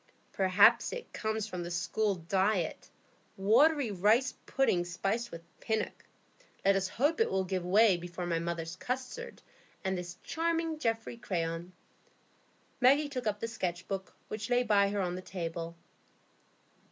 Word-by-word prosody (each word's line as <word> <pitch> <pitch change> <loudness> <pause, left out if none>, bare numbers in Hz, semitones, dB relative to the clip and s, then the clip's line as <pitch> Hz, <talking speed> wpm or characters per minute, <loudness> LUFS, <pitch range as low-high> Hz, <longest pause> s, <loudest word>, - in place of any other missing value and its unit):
"Perhaps 190 +1 +5
it - - -7
comes 220 -1 -2
from 185 -4 -5
the 175 - -4
school 195 +4 0
diet,—watery 200 - +1
rice 215 +7 +3
pudding 190 -10 +2
spiced 195 +7 -2
with 170 0 -9 0.2
Pinnock. 220 -1 -2 0.6
Let 195 0 +5
us 195 -1 +1
hope 290 - +1
it - - +3
will 190 0 +1
give 185 -1 -2
way 195 +1 +5
before 175 +1 -6
my 170 -1 0
mother's 165 0 -3
custards 260 - -5 0.4
and 190 -1 0
this 180 0 -6
charming 330 -1 -1
Geoffrey 225 -2 -1
Crayon." 170 -4 -3 1.1
Maggie 280 +4 +5
took 255 -5 -4
up 210 -1 0
the 230 - -1
"Sketch 185 -6 -3
Book," 195 -1 -5
which 215 +2 -5
lay 245 0 +3
by 200 -3 +4
her 205 0 -1
on 180 -1 -1
the 180 - -5
table. 170 -2 -5
200 Hz, 145 wpm, -31 LUFS, 180-235 Hz, 1.1 s, Perhaps